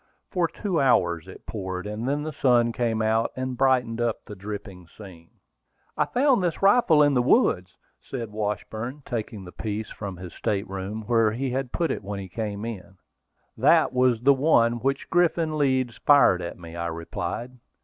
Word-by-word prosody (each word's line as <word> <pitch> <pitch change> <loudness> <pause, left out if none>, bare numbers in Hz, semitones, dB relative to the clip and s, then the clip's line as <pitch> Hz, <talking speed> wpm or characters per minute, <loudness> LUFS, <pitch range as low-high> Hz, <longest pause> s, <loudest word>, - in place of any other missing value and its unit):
For 175 -2 +1
two 180 -2 -2
hours 90 -10 +2
it 95 - -12
poured, 95 -3 -5
and 105 +4 -3
then 145 +1 -1
the 155 0 -5
sun 120 -4 +3
came 115 -2 -1
out, 110 +1 +1
and 130 0 -3
brightened 125 -3 +1
up 115 -2 -1
the 105 - -9
dripping 100 -3 -8
scene. 85 -3 -13 0.7
"I - - +2
found 260 -3 +2
this 175 +1 -2
rifle 195 -7 +5
in 145 -1 +3
the 125 - +3
woods," 95 - +2 0.2
said 115 -5 -6
Washburn, 110 +5 -4
taking 110 -5 -5
the 90 - -10
piece 110 +1 -5
from 100 -3 -6
his 90 -2 -9
state 100 0 -2
room, 95 +3 -5
where 115 -2 +3
he 130 +2 -2
had 130 -1 -2
put 170 -2 0
it - - -4
when 100 0 -5
he 95 -1 -8
came 105 +1 -4
in. 95 -4 -8 0.6
"That - - +4
was 125 -2 +2
the 140 +2 +6
one 125 -5 +3
with 120 - -12
which 135 0 -1
Griffin 165 -2 +2
Leeds 130 -5 +1
fired 140 -11 +5
at 85 - -6
me," 85 -1 -10
I 85 0 -3
replied. 110 +9 -5
115 Hz, 185 wpm, -25 LUFS, 100-135 Hz, 0.7 s, the